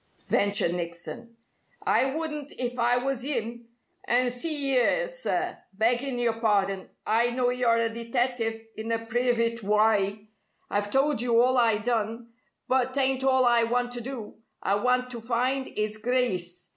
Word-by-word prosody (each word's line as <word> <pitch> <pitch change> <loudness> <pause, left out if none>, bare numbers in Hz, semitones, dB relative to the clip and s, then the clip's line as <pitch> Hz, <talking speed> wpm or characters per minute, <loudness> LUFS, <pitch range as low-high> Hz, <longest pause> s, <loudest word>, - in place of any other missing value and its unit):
ventured 200 -4 +3
Nickson. 170 +6 -6 0.5
"I - - +3
wouldn't 300 -3 -4
if 245 0 -4
I 240 +1 +3
was 255 0 -2
'im. 235 -4 -3 0.4
And 245 0 +2
see 280 0 +1
'ere, - - +2
sir, - - -3 0.2
beggin' 245 +4 +1
your 230 -2 0
pardon, 195 -3 +1 0.2
I 230 +2 +2
know 245 0 +1
you're 245 -2 +2
a 230 0 +2
detective, 230 -1 -2
in 220 +1 -5
a 230 0 -1
privit 230 0 +1
wye. 210 0 +1 0.4
I've 205 0 0
told 270 0 +2
you 235 -1 +3
all 255 +2 +4
I 230 -4 +4
done. 230 +1 -2 0.3
But 260 0 +1
t'ain't 265 -1 +1
all 260 -1 +4
I 240 -1 +4
want 245 +1 0
to 245 -1 -3
do. 240 -4 -7 0.3
I 195 - +1
want 250 +2 +1
to 235 -2 -7
find 255 +3 0
'is 215 0 -2
Grice. 190 -8 -1
235 Hz, 155 wpm, -27 LUFS, 220-255 Hz, 0.5 s, all